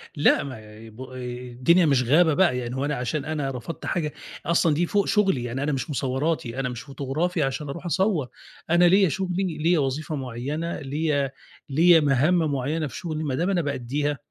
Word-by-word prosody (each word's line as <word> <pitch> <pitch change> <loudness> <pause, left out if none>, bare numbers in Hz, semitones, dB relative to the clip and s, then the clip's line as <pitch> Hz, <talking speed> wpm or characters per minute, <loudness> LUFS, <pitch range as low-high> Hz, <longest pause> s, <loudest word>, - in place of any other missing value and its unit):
لأ، 145 - +4
ما 110 -4 -10
بو 130 +4 -10
الدنيا 125 +6 +1
مش 140 -4 +3
غابة 155 +5 +4
بقى، 175 -6 +3
يعني 125 0 -4
هو 135 +2 -1
أنا 150 0 -1
عشان 135 +4 -2
أنا 150 -3 -2
رفضت 125 +6 -7
حاجة 155 -4 -2 0.3
أصلًا 165 -2 +3
دي 170 +4 +1
فوق 200 +2 +1
شُغلي 195 - +2
يعني 120 +3 -3
أنا 150 - 0
مش 135 +4 -3
مصوراتي 135 -1 -1
أنا 125 - -1
مش 120 -1 -6
فوتوغرافي 145 +5 -2
عشان 135 +2 -3
أروح 170 +6 -7
أصوّر، 175 - +1 0.4
أنا 170 +2 +5
ليّا 190 0 +5
شُغلي 185 +1 -2
ليّا 165 +2 +2
وظيفة 150 +3 -2
معيّنة 140 +6 -4
ليّا 145 -1 -1 0.4
ليّا 165 +4 +6
مهام 150 +3 +2
معيّنة 145 +4 -1
في 120 - -8
شُغلي 155 -2 -4
ما 140 -4 -1
دام 175 +7 0
أنا 180 -3 +2
بأدّيها، 145 +1 -2
145 Hz, 185 wpm, -25 LUFS, 130-165 Hz, 0.4 s, ليّا